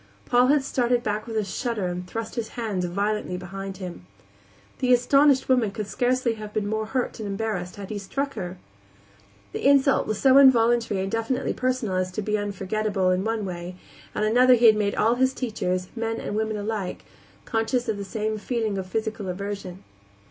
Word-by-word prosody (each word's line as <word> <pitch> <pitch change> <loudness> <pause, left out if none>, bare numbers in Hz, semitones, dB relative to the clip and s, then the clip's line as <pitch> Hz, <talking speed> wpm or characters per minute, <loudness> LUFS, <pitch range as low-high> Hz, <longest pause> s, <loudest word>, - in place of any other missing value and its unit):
Paul 245 +1 +4
had 285 0 +3
started 245 -2 +1
back 215 0 -2
with 225 -1 -3
a 215 - +2
shudder 215 +1 -2
and 180 0 -4
thrust 225 +3 -5
his 230 -2 -3
hands 210 -6 -1
violently 200 +1 -1
behind 195 +1 -7
him. 180 - -8 0.7
The 255 -1 +1
astonished 270 +2 +4
woman 250 -5 +3
could 215 +1 -5
scarcely 250 +2 0
have 210 0 -8
been 215 -1 0
more 220 +1 -2
hurt 250 +1 -2
and 210 -2 -4
embarrassed 195 -3 -3
had 200 0 -8
he 210 - -3
struck 275 +8 -2
at - - -17
her. 180 +1 -5 0.9
The - - -5
insult 275 0 +4
was 215 - -2
so 270 0 +6
involuntary 235 -6 +4
and 195 +1 -3
definitely 230 +4 -1
personal 255 -7 -1
as 185 0 0
to 215 - -3
be 210 +1 0
unforgettable. 205 -1 -1
In 185 +1 +1
one 220 -1 -1
way 175 -1 -6 0.4
and 210 - +1
another 250 +3 +6
he 240 0 +3
had 220 -1 +8
made 205 -1 0
all 225 +2 +3
his 260 0 +3
teachers, 185 -7 -2
men 225 0 -2
and - - -4
women 220 0 -1
alike, 205 -2 -4 0.4
conscious 225 +2 0
of 220 -2 -1
the 200 - -4
same 215 +2 -3
feeling 220 -3 -2
of 185 - -5
physical 215 -1 -3
aversion. 195 -1 -5
215 Hz, 190 wpm, -25 LUFS, 195-240 Hz, 0.9 s, had